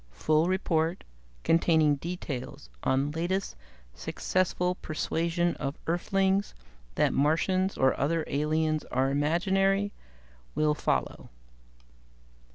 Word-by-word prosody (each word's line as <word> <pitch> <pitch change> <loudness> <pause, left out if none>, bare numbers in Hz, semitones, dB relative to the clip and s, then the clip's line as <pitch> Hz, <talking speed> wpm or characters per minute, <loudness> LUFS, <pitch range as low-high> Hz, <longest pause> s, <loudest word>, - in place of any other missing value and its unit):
Full 155 - +1
report, 170 -2 0 0.4
containing 160 -3 +3
details 135 - -6
on 135 +2 +1
latest 175 +5 -2 0.4
successful 180 - -1
persuasion 170 +1 -1
of 140 0 -4
Earthlings 195 +3 0 0.4
that - - +2
Martians 185 +6 +1
or 130 0 +4
other 160 +4 +1
aliens 155 +1 0
are 130 +2 0
imaginary, 195 +7 +1 0.6
will 150 0 +2
follow." 150 - -2
160 Hz, 90 wpm, -28 LUFS, 145-185 Hz, 0.6 s, or